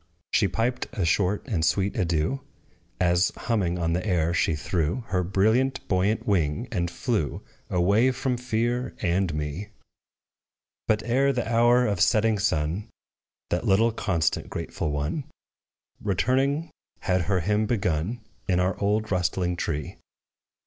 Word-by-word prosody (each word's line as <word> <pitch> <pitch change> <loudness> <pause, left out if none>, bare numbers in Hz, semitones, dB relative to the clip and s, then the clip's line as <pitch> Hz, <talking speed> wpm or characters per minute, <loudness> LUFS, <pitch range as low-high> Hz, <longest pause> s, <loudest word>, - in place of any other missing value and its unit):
She 100 - +3
piped 115 +6 -1
a 95 - -1
short 95 +6 +1
and 95 -11 -1
sweet 95 +4 +1
adieu, 85 - 0 0.6
As, 90 +1 +3
humming 95 -7 0
on 85 -1 0
the 90 - -1
air, 85 -5 +1
she 85 -2 +1
threw 85 +7 -1
Her 90 -1 +1
brilliant, 110 +9 +1
buoyant 100 +3 +1
wing, 95 - 0
and 85 -3 -1
flew 85 - -2 0.3
Away 100 +8 +3
from 130 0 -1
fear 120 +1 -1
and 90 0 +1
me: 75 +6 -4 1.2
But, 110 0 +2
ere 135 +4 +2
the 125 -3 -2
hour 120 +2 +4
of 100 -6 0
setting 110 +3 +3
sun, 80 +2 -1 0.6
That 90 +7 0
little 110 +4 +4
constant, 95 -8 -1
grateful 80 - -3
one, 75 - -2 0.8
Returning, 135 - +1 0.3
had 90 0 +1
her 95 -2 +1
hymn 105 +4 +1
begun 100 0 -1 0.3
In 90 -2 +2
our 90 +1 +1
old 105 +1 0
rustling 90 -1 0
tree. 75 -3 -3
100 Hz, 135 wpm, -26 LUFS, 85-115 Hz, 1.2 s, hour